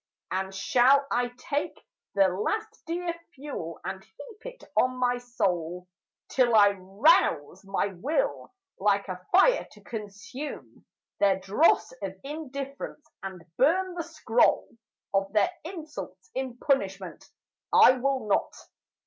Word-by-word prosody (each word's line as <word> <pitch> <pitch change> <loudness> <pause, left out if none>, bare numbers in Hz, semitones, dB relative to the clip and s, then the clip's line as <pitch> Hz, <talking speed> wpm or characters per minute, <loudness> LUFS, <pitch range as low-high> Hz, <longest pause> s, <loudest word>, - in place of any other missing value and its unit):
And 190 +1 -1
shall 260 +7 +4
I 245 0 +1
take 285 +3 -3 0.4
The 195 -1 +6
last 430 - -3
dear 340 +1 -2 0.2
fuel 265 - -6
and 190 0 -5
heap 430 - -14
it - - -9
on 255 0 +2
my 245 -1 +1
soul 180 -7 -2 0.4
Till 245 -3 +3
I 205 -1 +7
rouse 190 - +2
my 195 +1 -1
will 310 - -1 0.3
like 200 0 +2
a 180 0 -6
fire - - +5
to - - -17
consume 225 +6 -8 0.3
Their 195 -2 +4
dross 205 - +3
of - - -5
indifference, 280 0 -6 0.2
and 190 -3 -7
burn 365 +7 +3
the 350 - -3
scroll 310 -8 +2 0.4
Of 195 0 +1
their 210 -2 +3
insults 295 - -8
in 260 -2 -4
punishment? 195 - -1 0.5
I - - +8
will 260 -1 0
not! 200 - +1
245 Hz, 125 wpm, -27 LUFS, 195-295 Hz, 0.5 s, I